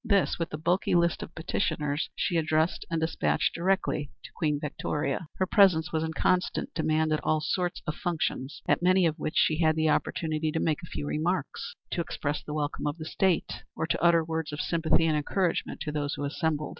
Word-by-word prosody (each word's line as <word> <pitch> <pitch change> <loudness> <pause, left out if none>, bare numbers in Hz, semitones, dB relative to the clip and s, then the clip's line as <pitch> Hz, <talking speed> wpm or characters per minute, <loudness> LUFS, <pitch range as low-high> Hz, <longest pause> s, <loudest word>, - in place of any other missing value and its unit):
This, 200 -7 +2
with 165 - -1
the 155 - -5
bulky 175 +4 +1
list 170 -1 +2
of 165 - -8
petitioners, 155 -3 -1
she 175 - -1
addressed 160 +1 +1
and 165 -1 0
despatched 160 +1 +1
directly 180 -5 0
to - - -10
Queen 150 -3 0
Victoria. 150 +1 -2
Her 190 - +1
presence 180 -4 +4
was 160 0 +1
in 160 0 -3
constant 180 +2 0
demand 155 0 +1
at 155 - -1
all 155 - +2
sorts 180 +3 -2
of 150 - -1
functions, 155 -5 -3
at - - +3
many 185 +1 +4
of 160 0 0
which 155 - -3
she 155 0 +3
had 155 -2 +3
the 160 0 +2
opportunity 155 0 0
to 160 - 0
make 160 +1 0
a 170 - -9
few - - -4
remarks; 180 - -2 0.2
to 175 - 0
express 145 -3 -3
the 150 - -6
welcome 150 0 -2
of 145 +2 -2
the 155 - -7
State, 185 +1 0
or - - -1
to - - -1
utter 170 -1 +4
words 160 -1 -3
of 150 - -5
sympathy 165 0 +2
and 160 -1 +2
encouragement 170 +4 -1
to 150 - -2
those 145 -1 -2
assembled. 150 +1 -1
160 Hz, 205 wpm, -28 LUFS, 150-170 Hz, 0.2 s, presence